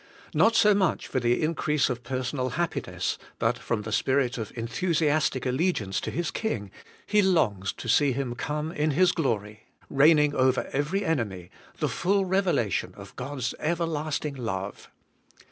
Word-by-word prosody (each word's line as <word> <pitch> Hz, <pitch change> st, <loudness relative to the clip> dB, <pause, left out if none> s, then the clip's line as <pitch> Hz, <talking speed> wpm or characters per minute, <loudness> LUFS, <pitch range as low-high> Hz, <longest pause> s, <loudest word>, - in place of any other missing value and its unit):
Not 225 Hz, +1 st, +4 dB
so 210 Hz, -1 st, +6 dB
much 190 Hz, -4 st, +1 dB
for 130 Hz, -, -1 dB
the 120 Hz, +4 st, +1 dB
increase 155 Hz, -2 st, +1 dB
of 125 Hz, -2 st, -3 dB
personal 130 Hz, +1 st, -2 dB
happiness, 170 Hz, -1 st, -2 dB, 0.2 s
but -, -, 0 dB
from 105 Hz, -2 st, -2 dB
the 110 Hz, -, -6 dB
spirit 130 Hz, +1 st, +1 dB
of 110 Hz, -, -5 dB
enthusiastic 150 Hz, +3 st, 0 dB
allegiance 125 Hz, -, 0 dB
to -, -, -3 dB
his 170 Hz, -1 st, -2 dB
King, 105 Hz, -, -3 dB, 0.3 s
he 210 Hz, 0 st, +3 dB
longs 110 Hz, -, +2 dB
to -, -, -9 dB
see 135 Hz, +5 st, +4 dB
Him 130 Hz, -1 st, -2 dB
come 150 Hz, +5 st, -3 dB
in 155 Hz, -2 st, 0 dB
His 175 Hz, +5 st, +4 dB
glory, 110 Hz, -, -2 dB, 0.2 s
reigning 150 Hz, +1 st, +5 dB
over 130 Hz, -2 st, +2 dB
every 150 Hz, +9 st, 0 dB
enemy, 105 Hz, -, -2 dB, 0.3 s
the -, -, 0 dB
full 195 Hz, +2 st, +1 dB
revelation 180 Hz, -, 0 dB
of -, -, -11 dB
God's 130 Hz, -1 st, -3 dB
everlasting 155 Hz, -2 st, -1 dB
love. 105 Hz, -7 st, -5 dB
145 Hz, 150 wpm, -27 LUFS, 120-165 Hz, 0.3 s, so